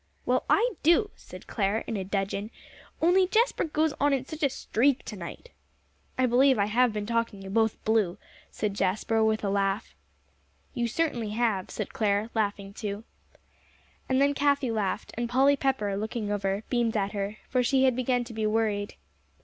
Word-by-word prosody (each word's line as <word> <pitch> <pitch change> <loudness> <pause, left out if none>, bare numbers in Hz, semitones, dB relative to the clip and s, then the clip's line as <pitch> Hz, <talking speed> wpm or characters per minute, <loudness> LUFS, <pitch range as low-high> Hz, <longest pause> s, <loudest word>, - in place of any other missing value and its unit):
"Well, - - +1
I - - +4
do," 345 +7 +4
said - - -12
Clare, 205 0 -1
in 230 - -4
a 195 - -2
dudgeon, 195 +2 -2 0.5
"only 365 +2 +5
Jasper 460 +6 +2
goes 310 -1 0
on 285 0 +3
in 265 -1 -1
such 315 +3 -8
a 280 - +3
streak 265 +2 +1
to 215 - -6
night." 190 - -9 0.7
"I 255 - +3
believe 255 +2 +4
I 200 - +2
have 240 +3 +3
been 210 -1 -3
talking 230 -3 -1
you 190 - -7
both 220 +1 +1
blue," 215 -4 +2 0.3
said 210 -2 -2
Jasper, 215 +3 +1
with 220 0 +1
a 200 - 0
laugh. 195 +1 -1 0.8
"You 240 -3 -1
certainly 240 -4 -1
have," 220 -6 0
said 210 - -5
Clare, 210 +1 0
laughing 200 -2 -2
too. 205 0 -5 1.1
And 260 0 +2
then 280 +1 +3
Cathie 280 -3 +1
laughed, 210 -1 -2
and 235 0 -2
Polly 270 +3 +4
Pepper, 260 -8 0
looking 215 +1 -3
over, 200 0 -1
beamed 235 -3 0
at 200 -1 0
her, 205 +1 -3
for 255 - +1
she 260 +2 +2
had 260 -2 +4
begun 250 0 +1
to 235 -1 -10
be 220 -1 -1
worried. 215 -2 0
225 Hz, 180 wpm, -27 LUFS, 205-265 Hz, 1.1 s, only